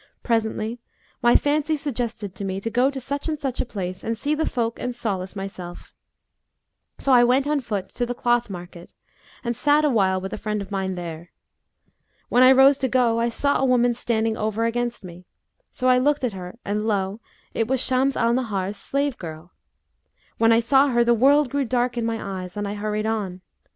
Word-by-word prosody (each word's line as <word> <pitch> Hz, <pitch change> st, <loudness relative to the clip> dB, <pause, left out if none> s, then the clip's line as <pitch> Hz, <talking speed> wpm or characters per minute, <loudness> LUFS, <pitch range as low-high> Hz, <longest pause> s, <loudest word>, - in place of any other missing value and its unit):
Presently 225 Hz, 0 st, -1 dB, 0.4 s
my 240 Hz, -1 st, +5 dB
fancy 300 Hz, +2 st, +2 dB
suggested 235 Hz, -, -4 dB
to 200 Hz, -, -7 dB
me 190 Hz, 0 st, -2 dB
to 230 Hz, -, -3 dB
go 250 Hz, +4 st, +3 dB
to 275 Hz, -1 st, -5 dB
such 280 Hz, +4 st, -3 dB
and 305 Hz, -1 st, -2 dB
such 270 Hz, -4 st, -2 dB
a -, -, -3 dB
place 185 Hz, -4 st, -5 dB
and 225 Hz, 0 st, -2 dB
see 290 Hz, +6 st, -1 dB
the 315 Hz, +1 st, 0 dB
folk 230 Hz, -2 st, -2 dB
and 250 Hz, -1 st, -3 dB
solace 195 Hz, -5 st, -3 dB
myself; 185 Hz, -3 st, -8 dB, 1.0 s
so 275 Hz, -, 0 dB
I 245 Hz, -1 st, +7 dB
went 255 Hz, +3 st, +3 dB
on 295 Hz, -1 st, 0 dB
foot 205 Hz, -6 st, -4 dB
to 245 Hz, -, -3 dB
the 245 Hz, -, -3 dB
cloth 240 Hz, -1 st, +1 dB
market 175 Hz, -2 st, -9 dB, 0.5 s
and 235 Hz, -1 st, -2 dB
sat 295 Hz, +4 st, +3 dB
awhile 195 Hz, -9 st, +2 dB
with 190 Hz, +1 st, -6 dB
a -, -, -5 dB
friend 210 Hz, -1 st, -2 dB
of 200 Hz, 0 st, -7 dB
mine 190 Hz, -1 st, -2 dB
there. 170 Hz, -1 st, -7 dB, 1.0 s
When 245 Hz, -, +4 dB
I 255 Hz, +1 st, +8 dB
rose 270 Hz, +1 st, +6 dB
to 265 Hz, -, +1 dB
go, 240 Hz, -2 st, +2 dB
I 235 Hz, +1 st, +1 dB
saw 280 Hz, +5 st, +1 dB
a 270 Hz, -, +2 dB
woman 245 Hz, -1 st, +3 dB
standing 225 Hz, -2 st, -1 dB
over 220 Hz, +1 st, -1 dB
against 240 Hz, -1 st, -2 dB
me; 180 Hz, 0 st, -11 dB, 0.4 s
so 255 Hz, -, -2 dB
I 250 Hz, 0 st, +5 dB
looked 290 Hz, +2 st, +1 dB
at 245 Hz, -4 st, 0 dB
her, 180 Hz, +2 st, -8 dB
and 210 Hz, +2 st, -1 dB
lo! 200 Hz, 0 st, -1 dB, 0.3 s
it 225 Hz, -, 0 dB
was 265 Hz, +1 st, +1 dB
Shams 260 Hz, +2 st, +1 dB
al 235 Hz, 0 st, +2 dB
Nahar's 205 Hz, -5 st, -2 dB
slave 280 Hz, +2 st, -2 dB
girl. 160 Hz, +1 st, -8 dB, 0.9 s
When 230 Hz, 0 st, +5 dB
I 230 Hz, +1 st, +5 dB
saw 270 Hz, +4 st, +4 dB
her, 240 Hz, -3 st, +3 dB
the 235 Hz, 0 st, +4 dB
world 275 Hz, +3 st, +4 dB
grew 280 Hz, 0 st, 0 dB
dark 245 Hz, 0 st, 0 dB
in 235 Hz, -1 st, -1 dB
my 200 Hz, -4 st, -3 dB
eyes 180 Hz, +2 st, -9 dB
and 205 Hz, 0 st, -2 dB
I 200 Hz, -, -3 dB
hurried 210 Hz, +1 st, -2 dB
on. 200 Hz, -5 st, -2 dB
230 Hz, 205 wpm, -23 LUFS, 200-255 Hz, 1.0 s, I